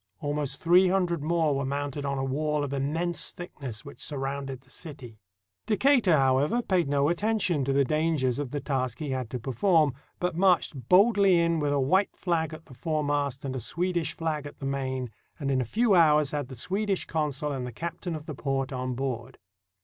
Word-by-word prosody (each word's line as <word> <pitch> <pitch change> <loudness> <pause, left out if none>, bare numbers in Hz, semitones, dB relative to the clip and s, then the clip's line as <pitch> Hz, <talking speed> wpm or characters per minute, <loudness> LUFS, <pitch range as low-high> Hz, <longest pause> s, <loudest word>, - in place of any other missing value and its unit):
Almost 145 -2 -2
three 180 +3 +5
hundred 180 -4 +1
more 160 -1 +1
were 140 - -1
mounted 145 +1 -3
on 140 0 -1
a 135 - -1
wall 150 +2 0
of 140 -1 -3
immense 160 +6 -1
thickness 135 -10 -8
which 140 - -11
sur 145 - -4
rounded 135 -1 -4
the 130 - -26
city. 135 -10 -9 0.5
Decatur, 220 - +4
however, 135 - +2
paid 180 -8 +1
no 140 0 +2
attention 185 -3 +1
to 135 - 0
the 140 0 +3
dangers 150 -4 +1
of 145 -3 -3
the 145 - -3
task 130 -5 -2
he 150 -3 -4
had 130 -3 -3
to 125 - -3
perform, 145 - +2 0.3
but 180 -2 -1
marched 170 -8 +2
boldly 195 -2 +5
in 170 -1 +2
with 145 -1 0
a 145 - +2
white 185 +10 +2
flag 165 -3 -1
at 155 0 -10
the - - -14
foremast 145 -1 -1
and 130 -1 -3
a - - -2
Swedish 170 - -1
flag 155 -3 -3
at 145 - -12
the 135 - -7
main, 130 -3 -2 0.3
and 140 -2 -1
in 130 -1 +2
a - - -1
few 220 - +2
hours 150 -4 +5
had 145 -3 -2
the 130 - -9
Swedish 195 - -1
consul 150 -2 -1
and 130 -3 -3
the - - -6
captain 170 - -5
of 155 -1 -7
the 155 - -5
port 135 -1 -2
on 130 -1 -3
board. 130 -1 -4
145 Hz, 205 wpm, -27 LUFS, 135-170 Hz, 0.5 s, three